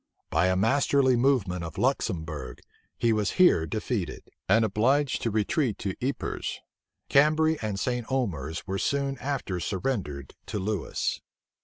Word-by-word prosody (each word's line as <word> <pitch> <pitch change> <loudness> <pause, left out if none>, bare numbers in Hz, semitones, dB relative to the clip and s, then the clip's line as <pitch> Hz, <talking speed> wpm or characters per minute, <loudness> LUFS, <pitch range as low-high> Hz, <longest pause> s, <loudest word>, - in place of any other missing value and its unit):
By 80 +3 +3
a 95 - +2
masterly 130 +5 +3
movement 120 -9 +1
of 80 -2 -7
Luxembourg, 80 - -2 0.4
he 115 -1 +2
was 105 -2 0
here 175 - +5
defeated, 105 -5 -3 0.2
and 110 0 +5
obliged 130 +7 +2
to 115 - 0
retreat 110 +3 0
to 95 -2 -3
Ypres. 135 +2 -3 0.5
Cambray 155 +2 +4
and 105 -3 -2
St. 125 +1 -2
Omers 80 - -2
were 95 0 -2
soon 140 +1 -1
after 130 -9 -2
surrendered 90 - -3
to - - -3
Lewis. 100 -1 -2
110 Hz, 135 wpm, -27 LUFS, 90-135 Hz, 0.5 s, here